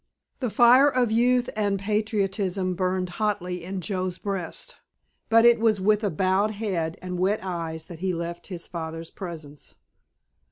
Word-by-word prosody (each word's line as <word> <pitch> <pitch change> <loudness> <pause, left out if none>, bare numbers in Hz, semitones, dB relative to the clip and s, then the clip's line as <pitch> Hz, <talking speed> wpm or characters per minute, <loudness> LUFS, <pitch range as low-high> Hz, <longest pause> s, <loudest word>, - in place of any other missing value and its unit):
The 250 -4 -1
fire 245 +6 +6
of 250 -4 +1
youth 245 +2 +3
and 205 -2 +1
patriotism 195 -3 0
burned 185 0 -1
hotly 180 -4 -1
in 190 +1 -4
Joe's 185 -1 -2
breast, 195 -5 -5 0.5
but 230 +1 +6
it 235 -1 +6
was 220 -3 +3
with 205 -3 +1
bowed 190 +3 +2
head 180 -6 -2
and 180 -1 -4
wet 195 +4 +2
eyes 165 -3 -4
that 170 -2 -10
he 185 +1 0
left 170 0 -5
his 175 -3 -6
father's 165 -1 -6
presence. 155 -6 -9
190 Hz, 150 wpm, -25 LUFS, 175-215 Hz, 0.5 s, fire